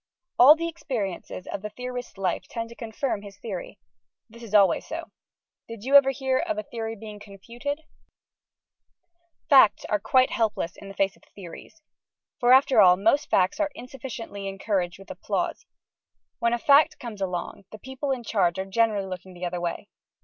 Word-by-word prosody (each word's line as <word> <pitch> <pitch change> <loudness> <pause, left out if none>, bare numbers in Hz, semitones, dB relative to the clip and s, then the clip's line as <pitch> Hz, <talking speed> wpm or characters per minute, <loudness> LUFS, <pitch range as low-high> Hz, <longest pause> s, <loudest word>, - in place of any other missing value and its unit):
All 275 +5 +10
the 335 +1 -3
experiences 215 - -5
of 200 - -5
the 210 - -5
theorist's 250 0 -7
life 185 -2 -2
tend 230 -1 -5
to 235 - -12
confirm 230 -1 -3
his 200 -1 -12
Theory. 195 -6 -7 0.5
This 235 +1 -14
is 220 -3 -4
always 195 -5 +5
so. 330 +1 -7 0.6
Did 230 -2 -9
you 265 +3 -3
ever 280 -1 +8
hear 265 -1 0
of 330 -2 -2
a 320 - -3
Theory 225 -1 -5
being 210 -1 -10
confuted? 235 +9 -6 1.7
Facts 265 -7 +6
are 210 - 0
quite 255 +5 +3
helpless 215 -6 -1
in 200 - -12
the 195 - -10
face 195 -1 0
of - - -25
Theories. 200 - -12 0.6
For 245 -1 +3
after 260 -3 +6
all, 180 -2 +7
most 280 +10 +2
Facts 185 - +2
are 305 -1 +1
insufficiently 230 -6 -7
encouraged 195 -2 -2
with 195 - -12
applause. - - -3 0.7
When 235 0 +1
a - - +2
Fact 280 +4 +4
comes 225 -5 -8
along, 185 +1 -4
the 215 - -9
people 265 +5 -6
in 260 -3 -1
charge 185 -6 +1
are 190 - -2
generally 210 0 +1
looking 185 0 -8
the 180 +1 -5
other 175 0 -3
way. 170 -1 -4
225 Hz, 175 wpm, -25 LUFS, 195-260 Hz, 1.7 s, All